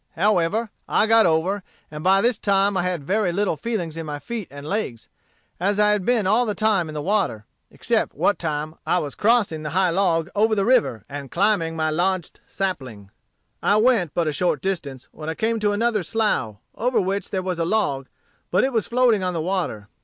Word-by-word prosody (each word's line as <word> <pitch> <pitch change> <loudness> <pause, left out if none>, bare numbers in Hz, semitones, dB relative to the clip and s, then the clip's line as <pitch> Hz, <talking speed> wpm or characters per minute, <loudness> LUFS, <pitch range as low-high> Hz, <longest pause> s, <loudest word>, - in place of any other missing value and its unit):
However, 205 +3 +1 0.2
I - - +3
got 225 -2 +5
over, 175 +5 +1 0.3
and 150 0 -7
by 195 +1 +4
this 240 -1 +1
time 200 0 +2
I 185 - +2
had 175 -4 -2
very 195 +4 +1
little 200 -1 0
feeling 195 -3 -3
in 165 - -4
my 145 -1 -4
feet 215 +7 -6
and 140 +1 -9
legs, 160 - -3 0.5
as 200 +3 0
I 210 0 +5
had 210 -3 0
been 240 -5 +2
all 225 +5 +3
the 210 - -1
time 210 -6 +1
in 155 - -7
the 150 - -3
water, 195 - 0 0.2
except - - -1
what 205 - +1
time 155 -1 -3
I - - +1
was 145 -5 -3
crossing 210 -8 +2
the 155 - -4
high 185 -2 +3
log 170 -3 +1
over 220 +1 +2
the 200 -2 +1
river 235 - +2
and 140 -1 -7
climbing 180 - +1
my 155 -1 0
lodged 180 +2 -1
sapling. 130 - -4 0.5
"I 205 - +3
went 215 - +2
but 170 -2 +1
a - - +1
short 180 +4 0
distance 145 -9 -4
when 155 0 -7
I 160 - -3
came 225 +3 0
to 210 -1 +1
another 220 0 +1
slough, 170 - 0 0.2
over 250 +2 0
which 195 +1 -2
there 190 -2 -2
was 180 -2 -3
a - - +2
log, 165 -9 0 0.4
but - - +2
it 265 - 0
was 225 -3 0
floating 235 -4 +3
on 180 -1 -1
the - - -1
water. 170 - -2
190 Hz, 210 wpm, -23 LUFS, 160-215 Hz, 0.5 s, got